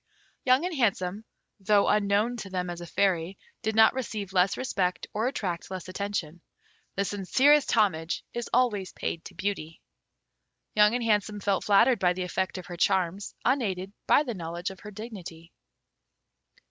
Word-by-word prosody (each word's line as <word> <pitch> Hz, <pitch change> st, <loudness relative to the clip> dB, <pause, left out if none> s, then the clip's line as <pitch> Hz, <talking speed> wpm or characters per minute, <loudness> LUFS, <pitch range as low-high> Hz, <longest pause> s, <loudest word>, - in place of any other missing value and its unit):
Young 260 Hz, +5 st, +4 dB
and 360 Hz, -, -2 dB
Handsome, 205 Hz, -5 st, 0 dB, 0.4 s
though 200 Hz, +1 st, +3 dB
unknown 210 Hz, +3 st, +2 dB
to 205 Hz, -4 st, -7 dB
them 180 Hz, -1 st, -2 dB
as 175 Hz, 0 st, -7 dB
a 175 Hz, -, -7 dB
Fairy, 185 Hz, 0 st, 0 dB, 0.2 s
did 220 Hz, 0 st, -1 dB
not 220 Hz, 0 st, +6 dB
receive 215 Hz, -7 st, -4 dB
less 185 Hz, 0 st, +3 dB
respect 185 Hz, -8 st, -1 dB
or 220 Hz, +3 st, 0 dB
attract 180 Hz, -9 st, -3 dB
less 185 Hz, -2 st, -6 dB
attention. 185 Hz, -4 st, -4 dB, 0.5 s
The 200 Hz, -, 0 dB
sincerest 260 Hz, +10 st, +3 dB
homage 185 Hz, -7 st, +1 dB
is 240 Hz, -1 st, -4 dB
always 215 Hz, -7 st, +1 dB
paid 165 Hz, -, -4 dB
to 180 Hz, -, -10 dB
beauty. 185 Hz, -4 st, -3 dB, 0.9 s
Young 210 Hz, +2 st, +5 dB
and 245 Hz, -, -1 dB
Handsome 210 Hz, -1 st, +1 dB
felt 200 Hz, -1 st, 0 dB
flattered 220 Hz, +4 st, +5 dB
by 180 Hz, -1 st, +3 dB
the 185 Hz, +1 st, -3 dB
effect 190 Hz, +1 st, -2 dB
of 185 Hz, -, -7 dB
her 175 Hz, -, -8 dB
charms 190 Hz, +1 st, 0 dB
unaided 200 Hz, -7 st, 0 dB
by 295 Hz, -, +5 dB
the 245 Hz, -5 st, -4 dB
knowledge 175 Hz, 0 st, -4 dB
of 190 Hz, -, -12 dB
her 210 Hz, -, -9 dB
dignity. 190 Hz, -6 st, -9 dB
200 Hz, 160 wpm, -27 LUFS, 180-220 Hz, 0.9 s, not